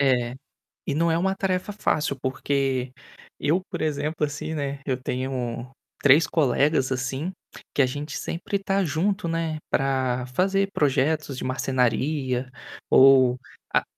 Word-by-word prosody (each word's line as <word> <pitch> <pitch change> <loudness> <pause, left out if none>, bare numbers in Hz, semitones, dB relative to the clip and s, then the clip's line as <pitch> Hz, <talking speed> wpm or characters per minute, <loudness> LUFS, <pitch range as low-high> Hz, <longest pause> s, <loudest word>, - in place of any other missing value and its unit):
É, 125 -3 +2 0.5
e - - -1
não 165 +2 +2
é 165 - +2
uma 190 +2 +1
tarefa 185 0 -1
fácil 150 -8 0
porque 130 -1 -1 0.5
eu, 165 +6 +1
por - - -4
exemplo, 150 0 -1
assim, 155 +2 -5
né, 140 -2 -3
eu 130 -3 0
tenho 125 -2 -3 0.3
3 145 +2 +6
colegas, 140 -2 +2
assim, 130 +6 -2 0.4
que - - 0
a - - +4
gente 145 +3 -5
sempre 175 +4 -3
está 195 0 0
junto, 180 +5 0
né, 165 -1 -1
para 130 -2 0
fazer 195 +8 +1
projetos 145 0 +1
de - - -4
marcenaria, 130 0 0 0.4
ou 130 -2 +6 0.3
a - - +3
140 Hz, 135 wpm, -25 LUFS, 130-160 Hz, 0.5 s, 3